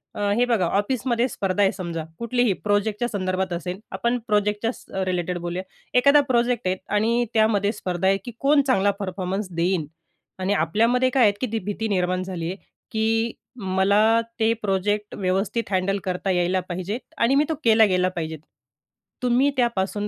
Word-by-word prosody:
अ, - - -6 0.2
हे 245 - +4
बघा 220 -7 +2
ऑफिसमध्ये 235 +6 0
स्पर्धा 195 -2 -1
आहे 195 - +4
समजा, 170 -4 -5 0.2
कुठलीही 235 -2 +1
प्रोजेक्टच्या 210 +2 +1
संदर्भात 185 -3 -2
असेल. 180 +2 -4
आपण 235 +1 0
प्रोजेक्टच्या 210 +1 +1
स - - -16 0.2
रिलेटेड 180 -1 -1
बोलूया. 175 +2 -4 0.4
एखादा 280 +3 +6
प्रोजेक्ट 240 -3 +1
आहे 185 - +1 0.2
आणि 230 +3 +2
त्यामध्ये 215 -2 +3
स्पर्धा 180 -4 -2
आहे, 195 0 +4
की 240 - -5
कोण 280 +1 +4
चांगला 205 -6 +3
परफॉर्मन्स 190 +1 -3
देईन. 170 -1 +1 0.5
आणि 190 +2 0
आपल्यामध्ये 230 +9 +2
काय 255 -1 +3
आहेत 205 -2 +5
की 255 - 0
ती 225 - 0
भीती 210 +2 -2
निर्माण 185 -2 0
झाली 185 -3 -5
आहे, - - -5 0.4
की 225 +1 +1 0.3
मला 200 +3 +3 0.2
ते 225 0 +3
प्रोजेक्ट 205 +1 -1
व्यवस्थित 195 +4 -1
हँडल 190 +1 +1
करता 185 +1 -2
यायला 180 +1 +1
पाहिजेत 185 +6 -3 0.2
आणि 240 +4 +3
मी 290 - +5
तो - - +1
केला 225 -1 +6
गेला 185 -2 +2
पाहिजेत. 160 -3 -5 0.8
तुम्ही 250 +3 +3
त्यापासून 210 -4 0
205 Hz, 165 wpm, -23 LUFS, 185-230 Hz, 0.8 s, एखादा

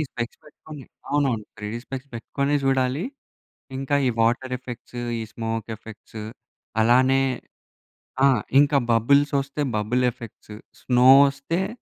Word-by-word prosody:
ఈ - - +1
స్పెక్ట్స్ 120 -1 -5
పెట్టుకొని 150 -2 -12 0.3
అవునవును. 135 -7 +1
3డీ 105 +2 -5
స్పెక్ట్స్ 135 +1 -7
పెట్టుకొనే 140 +5 -1
జూడాలి. 135 +4 +1 0.7
ఇంకా 135 +1 -1
ఈ - - +3
వాటరెఫెక్ట్స్, 125 0 -2 0.2
ఈ - - -3
స్మోకెఫెక్ట్స్ 110 -1 -6 0.6
అలానే 130 +3 +4 1.0
ఆ! - - +8 0.3
ఇంక 145 +1 +4 0.2
బబుల్సొస్తే 140 +4 +2
బబులెఫెక్ట్స్, 115 -1 -2 0.3
స్నో 125 0 +4 0.2
ఒస్తే 165 +8 -3
130 Hz, 100 wpm, -24 LUFS, 115-140 Hz, 1.0 s, ఆ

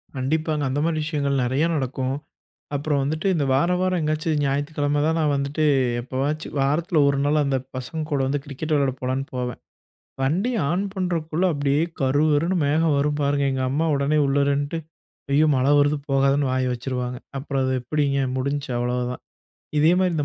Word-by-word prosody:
கண்டிப்பாங்க. 150 +3 -1
அந்த 140 +3 -1
மாரி 165 -1 0
விஷயங்கள் 140 -3 0
நெறைய 130 +6 +1
நடக்கும். 130 -1 -2 0.6
அப்புறம் 145 0 0
வந்துட்டு 155 +6 -1
இந்த 145 - +1
வாரம், 175 +7 +2
வாரம் 185 -1 +1
எங்கயாச்சும் 155 0 0
ஞாயித்துக்கிழமை 145 +1 0
தான் 160 +1 +1
நான் 150 -2 +2
வந்துட்டு 140 +3 -1 0.4
எப்போவாச்சும், 135 +5 -3
வாரத்துல 155 +4 +2
1 140 -1 +2
நாள் 150 +1 +3
அந்த 135 -1 +1 0.2
பசங்க 130 +5 -4
கூட 140 - +1
வந்து 145 +2 0
கிரிக்கெட் 155 +2 -4
வெளையாட 140 -3 +2
போகலான்னு 130 +1 -1
போவேன். 125 -1 -3 0.6
வண்டி 175 - +1 0.2
ஆன் 180 +5 0
பண்ணுறதுக்குள்ளே 175 -2 -1
அப்டீயே 145 +1 +1 0.2
கருகருன்னு 150 +6 +2
மேகம் 155 +1 +2
வரும் 145 +1 0
பாருங்க, 140 0 +1
எங்க 130 -1 -1
அம்மா 150 +5 0
உடனே 140 +2 +1
உள்ளே 140 +1 +2
இருன்ட்டு 145 +3 0 0.5
ஐயோ! 150 +3 +4
மழை 130 +2 +2
வருது 145 +1 +3
போகாதேன்னு 135 +1 +2
வாய 130 0 +1
வச்சுருவாங்க. 125 0 -3 0.2
அப்புறம் 135 -1 -2
அது 130 0 0
எப்டிங்க? 140 +1 0
முடிஞ்சு 140 +2 -2
அவ்வளவுதான். 125 +1 -2 0.6
இதே 155 +3 +5
மாதிரி 185 -2 +2
இந்த 145 - 0
145 Hz, 165 wpm, -23 LUFS, 135-155 Hz, 0.6 s, இதே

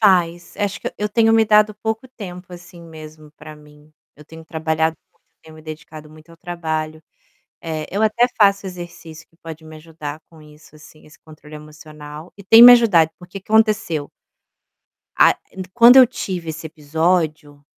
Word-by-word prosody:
Faz, 175 -4 +1
acho 205 -1 -3
que - - -6
eu 210 - -2
tenho 225 +1 +2
me 225 0 +4
dado 215 0 +3
pouco 220 +4 -5
tempo, 180 -7 -11
assim, 175 0 -13
mesmo 155 -2 -13
para 155 0 -13
mim, 150 0 -20 0.2
eu 150 - -16
tenho 160 +1 -14
trabalhado 160 0 -2 0.2
muito, - - -41 0.2
tenho 160 -1 -16
me 155 - -15
dedicado 155 0 -11
muito 155 +1 -18
ao 165 - -16
trabalho. 160 -2 -5 0.6
Eh, 155 -2 -5
eu 205 - -1
até 220 +3 +2
faço 200 -2 +3
exercício 175 -3 -11
que 165 - -33
pode 160 -1 -10
me 155 0 -12
ajudar 155 -1 -9
com 160 -2 -18
isso, 150 0 -19
assim, 155 0 -18
esse 150 - -19
controle 155 -1 -15
emocional, 150 +1 -13
e 200 - -13
tem 225 +4 +7
me 245 +1 +11
ajudado, 200 -10 +4
por 175 - -15
que 195 - -9
que 205 - -12
aconteceu? 215 -9 +1 1.1
A - - +4
e 190 - -7
quando 240 +1 +7
eu 260 -1 +8
tive 180 -8 -6
esse 160 +1 -8
episódio, 155 -1 -2
165 Hz, 180 wpm, -19 LUFS, 155-200 Hz, 1.1 s, me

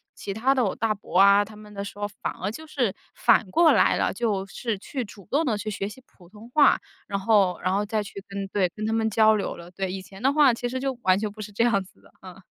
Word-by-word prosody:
其 200 - -6
他 245 +6 +2
的 255 - +2
我 195 - -1
大 225 -1 0
伯 195 -3 -4
啊， 200 +1 +7
他 215 +1 -13
们 210 0 -13
的 200 -1 -5
时 200 - -9
候 205 - -1
反 - - -1
而 190 +3 -4
就 315 +8 -10
是 245 -10 -1 0.2
反 225 -4 +3
过 335 - +5
来 - - +4
了， - - 0
就 210 -5 -1
是 225 +1 -3
去 260 +5 -4
主 200 -2 -14
动 295 +4 +2
地 230 -6 0
去 215 +1 -4
学 195 0 -3
习 260 +5 -13
普 175 -2 -20
通 210 +3 -14
话， 295 +2 +5 0.3
然 200 -1 -2
后， 195 -3 +3
然 185 - 0
后 200 +1 +1
再 215 0 -1
去 200 -1 -9
跟 200 0 -5
对， 190 -2 +1
跟 215 - -4
他 220 - 0
们 225 0 +1
交 220 0 +4
流 205 - -3
了。 170 +1 -12
对， 190 0 -3
以 190 - -4
前 195 +1 -13
的 270 - +4
话 290 -4 +5
其 245 +1 -3
实 260 +1 -3
就 270 0 -2
完 185 0 +4
全 215 - -1
不 215 +1 -10
是 210 - -7
这 205 +3 +1
样 210 -5 +2
子 190 - -21
的， - - -21
啊。 185 -2 -11
210 Hz, 300 characters per minute, -25 LUFS, 195-230 Hz, 0.3 s, 啊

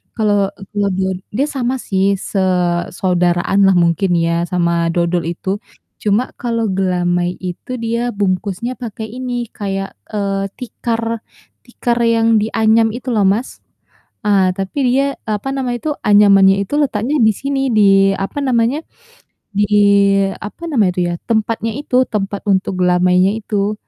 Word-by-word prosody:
kalau 205 -3 +1 0.2
kalau 205 -1 0
do 190 0 -1 0.3
dia 275 +4 +1
sama 255 0 0
sih, 190 -1 +1 0.2
se 200 - -3 0.6
saudaraanlah 180 +2 +2
mungkin 170 +3 +1
ya 170 +1 0
sama 170 -1 +1
dodol 175 0 0
itu. 180 +2 -6 0.5
Cuma 210 +4 +2 0.2
kalau 230 -2 -1
gelamai 175 -1 0
itu 180 +7 -6
dia 235 +1 -1
bungkusnya 200 +4 -1
pakai 220 -2 -6
ini 245 -2 -3
kayak, 195 - -4 0.2
eee, 195 -1 -2
tikar 230 -1 -3 0.4
tikar 240 -1 -2
yang 230 0 +2
dianyam 220 +1 +2
itu 250 +2 -8
loh, 205 - +3
Mas. 210 +7 +1 0.8
Ah, 190 -3 +3
tapi 195 +8 -4
dia, 275 +2 +1
apa 215 +5 -2
nama 260 -3 -2
itu, 300 +6 -3 0.2
anyamannya 200 -2 +6
itu 200 - -10
letaknya 260 0 0
di - - +5
sini, 275 0 -2 0.2
di 195 -1 +5
apa 195 +9 -4
namanya, 255 0 +1 0.8
di 205 - +3 0.8
apa 270 - -11
namanya 215 -10 +3
itu - - -2
ya, - - -2
tempatnya 225 0 0
itu, 285 -3 -2
tempat 200 -2 -3
untuk 190 -1 0
gelamainya 180 +1 +3
itu. 205 -1 -1
205 Hz, 140 wpm, -17 LUFS, 190-235 Hz, 0.8 s, anyamannya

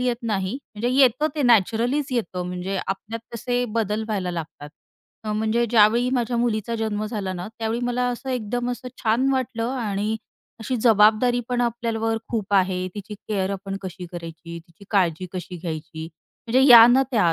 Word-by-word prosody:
येत 250 -1 0
नाही, 200 -4 -1 0.2
म्हणजे 230 +4 -1
येतं 270 +4 +4
ते 295 - -1
नॅचरलीच 240 +5 +3
येतं, 185 -6 -2
म्हणजे 180 +2 -4
आपल्यात 215 +4 -4
तसे 245 +2 -1
बदल 215 -1 0
व्हायला 195 -5 -2
लागतात. 160 -3 -7 0.6
अ, 215 - -2
म्हणजे 220 +2 +1
ज्यावेळी 235 +2 +4
माझ्या 240 -1 0
मुलीचा 235 -1 0
जन्म 215 -1 -2
झाला 205 -4 -3
ना, 180 +2 -6
त्यावेळी 225 +1 -2
मला 245 0 0
असं 260 +2 -5
एकदम 245 0 -2
असं 250 +1 -5
छान 235 +5 +2
वाटलं 250 -2 -1
आणि 210 -1 -1 0.5
अशी 245 +3 -2
जबाबदारी 225 +2 +4
पण 245 -1 0
आपल्यावर 225 -1 -1
खूप 210 -3 -2
आहे 185 -1 +2
तिची 210 0 -7
केअर 200 -2 -3
आपण 195 0 -5
कशी 185 -1 -7
करायची, 170 0 -8
तिची 170 +3 -18
काळजी 185 -3 +1
कशी 180 0 -6
घ्यायची? 160 -1 -6 0.4
म्हणजे 255 +3 +3
या 230 -1 +11
ना 250 +2 +5
त्या 190 -9 +3
220 Hz, 165 wpm, -23 LUFS, 190-240 Hz, 0.6 s, या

